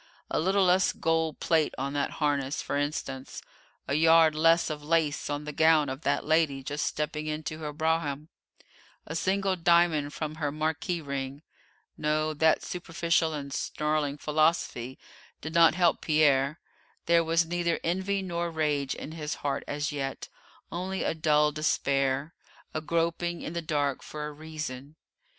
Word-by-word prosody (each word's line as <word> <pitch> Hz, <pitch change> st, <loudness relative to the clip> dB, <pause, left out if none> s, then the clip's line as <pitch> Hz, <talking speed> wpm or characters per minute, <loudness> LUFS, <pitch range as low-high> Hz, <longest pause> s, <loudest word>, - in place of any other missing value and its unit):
A -, -, +1 dB
little 190 Hz, +4 st, +3 dB
less 185 Hz, +1 st, +3 dB
gold 160 Hz, -2 st, 0 dB
plate 160 Hz, -3 st, +1 dB
on 140 Hz, +2 st, -3 dB
that 145 Hz, -1 st, 0 dB
harness, 145 Hz, -2 st, 0 dB
for -, -, -3 dB
instance, 140 Hz, -2 st, -3 dB, 0.4 s
a -, -, -1 dB
yard 160 Hz, +1 st, +6 dB
less 165 Hz, +1 st, +3 dB
of 150 Hz, -1 st, -5 dB
lace 155 Hz, -2 st, 0 dB
on 145 Hz, 0 st, -2 dB
the 150 Hz, -, -5 dB
gown 160 Hz, -2 st, +4 dB
of 135 Hz, +2 st, -5 dB
that -, -, 0 dB
lady 155 Hz, -4 st, +2 dB
just 145 Hz, +2 st, -2 dB
stepping 150 Hz, 0 st, -3 dB
into 155 Hz, +1 st, -4 dB
her 150 Hz, -2 st, -4 dB
brougham, 155 Hz, -1 st, -1 dB, 0.8 s
a 160 Hz, -, -6 dB
single 190 Hz, +2 st, +1 dB
diamond 170 Hz, -4 st, +3 dB
from 155 Hz, 0 st, -5 dB
her 145 Hz, -1 st, 0 dB
marquise 160 Hz, +3 st, -2 dB
ring 140 Hz, +1 st, -5 dB, 0.6 s
no, 155 Hz, +1 st, 0 dB
that 160 Hz, +1 st, +3 dB
superficial 170 Hz, -2 st, 0 dB
and 140 Hz, -1 st, -6 dB
snarling 150 Hz, -1 st, -1 dB
philosophy 150 Hz, -5 st, 0 dB, 0.4 s
did 160 Hz, +2 st, -6 dB
not 165 Hz, -1 st, +6 dB
help 175 Hz, -2 st, +2 dB
Pierre; 150 Hz, -1 st, +3 dB, 0.5 s
there 170 Hz, 0 st, +4 dB
was 165 Hz, +1 st, +2 dB
neither 170 Hz, 0 st, -1 dB
envy 190 Hz, +3 st, -1 dB
nor 170 Hz, -2 st, -2 dB
rage 150 Hz, -4 st, -1 dB
in 155 Hz, -, -7 dB
his 155 Hz, -2 st, -4 dB
heart 140 Hz, -, -1 dB
as 145 Hz, +1 st, -2 dB
yet; 135 Hz, -2 st, -4 dB, 0.4 s
only 185 Hz, +3 st, -3 dB
a -, -, 0 dB
dull 150 Hz, -1 st, +3 dB
despair, 140 Hz, -1 st, 0 dB, 0.4 s
a 155 Hz, -, -2 dB
groping 170 Hz, +1 st, -1 dB
in 155 Hz, -, -5 dB
the 170 Hz, -, -2 dB
dark 145 Hz, -4 st, -1 dB
for 150 Hz, 0 st, -6 dB
a 150 Hz, -, -5 dB
reason. 150 Hz, -2 st, -7 dB
155 Hz, 155 wpm, -28 LUFS, 145-165 Hz, 0.8 s, yard